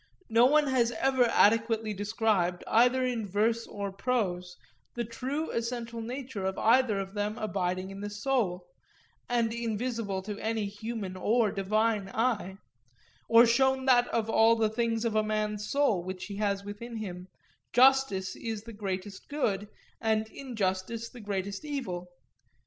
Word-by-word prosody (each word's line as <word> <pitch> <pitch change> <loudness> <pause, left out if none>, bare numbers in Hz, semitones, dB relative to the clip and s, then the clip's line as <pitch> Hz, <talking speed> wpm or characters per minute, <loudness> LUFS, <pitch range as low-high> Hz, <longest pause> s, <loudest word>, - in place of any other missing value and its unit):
No 230 +2 +6
one 300 +2 +4
has 255 -4 +2
ever 260 +2 +2
adequately 225 -1 +3
described 205 -3 0
either 250 +3 +4
in 235 -4 -2
verse 225 +4 0
or 200 -1 -5
prose 190 -5 -2 0.4
the 240 - -1
true 265 +7 -3
essential 230 0 -3
nature 245 -3 -5
of 190 0 -2
either 230 -2 +3
of 195 0 -5
them 210 +1 -2
abiding 185 -3 -2
in 195 - -8
the 205 +1 -4
soul, 205 -5 -1 0.6
and 235 -2 +1
invisible 230 -3 -2
to 210 +1 -6
any 220 -1 -1
human 205 -1 -5
or 215 +3 +2
divine 210 +1 0
eye; 215 -4 -1 0.7
or 230 +1 +8
shown 265 +2 +2
that 245 -2 +5
of 225 -1 -1
all 225 +1 +5
the 220 -1 +1
things 230 0 0
of 225 -2 0
a 215 - +4
man's 210 -1 -2
soul 275 -11 +2
which 185 0 -6
he 200 -1 -7
has 200 -1 0
within 230 +4 -7
him, 180 -4 -6 0.4
justice 250 -7 +4
is 220 -2 -5
the 230 0 -10
greatest 195 -1 -5
good, 210 -9 -1 0.3
and 220 -1 +1
injustice 225 -2 -3
the 245 - -11
greatest 200 +1 -3
evil. 230 -13 -4
220 Hz, 150 wpm, -29 LUFS, 200-235 Hz, 0.7 s, or